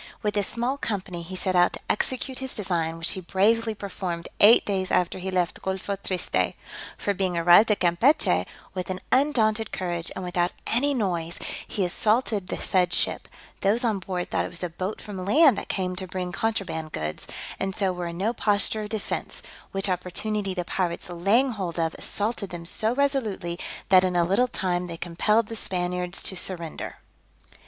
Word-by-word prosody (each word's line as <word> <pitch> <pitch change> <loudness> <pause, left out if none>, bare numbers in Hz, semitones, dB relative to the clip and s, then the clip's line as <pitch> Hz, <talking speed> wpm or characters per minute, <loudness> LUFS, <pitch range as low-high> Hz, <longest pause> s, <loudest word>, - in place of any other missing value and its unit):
With 210 -1 +1
this 205 -1 +2
small 250 +4 -1
company 185 -7 -3
he 180 +3 -7
set 185 0 -1
out 175 0 +5
to - - -5
execute 260 +3 -1
his 265 -1 -3
design, 170 -6 0
which 165 0 +1
he 190 - -2
bravely 220 +5 +2
performed 185 -4 -4
eight 215 +3 +8
days 190 -2 -1
after 180 +1 +1
he 190 +1 -3
left 180 -2 0
Golpho 190 +1 -2
Triste; 190 -2 -1 0.4
for 205 - 0
being 185 -2 -1
arrived 175 +6 +7
at 210 - +2
Campechy, 180 - +3 0.3
with 185 -2 -4
an 185 0 -3
undaunted 225 -6 +2
courage, 175 -2 -2
and 185 - -4
without 175 0 0
any 280 +5 +2
noise, 175 -7 -1 0.3
he 195 - -1
assaulted 210 +1 +1
the - - -3
said 180 -2 +2
ship: - - +1 0.3
those 215 +5 +2
on 220 -4 +1
board 180 -1 -4
thought - - +1
it - - -5
was 170 - -6
a 175 - -2
boat 185 +5 -4
from 195 -3 -6
land 275 - +6
that - - -8
came 185 -1 -1
to 185 0 -4
bring 180 0 -4
contraband 180 -6 -2
goods, 75 0 -4 0.3
and 195 -1 -2
so 195 -3 +1
were 175 -1 -4
in 170 0 -6
no 210 +6 0
posture 210 0 +2
of 210 - -5
defence; 215 -2 -4 0.3
which 195 +1 +1
opportunity 190 +2 -1
the 180 -1 -2
pirates 175 -1 -2
laying 205 +10 +3
hold 185 -7 -4
of, 165 -1 +1
assaulted 210 -1 -2
them 175 -2 -7
so 220 +6 0
resolutely, 225 -11 0 0.3
that 185 -1 +7
in 180 -1 0
a 175 - +4
little 200 +8 +3
time 180 -5 -1
they 170 -1 -6
compelled 210 +7 +1
the 225 - -7
Spaniards 180 -2 -2
to 190 - -2
surrender. 170 -3 -4
190 Hz, 185 wpm, -26 LUFS, 175-215 Hz, 0.4 s, eight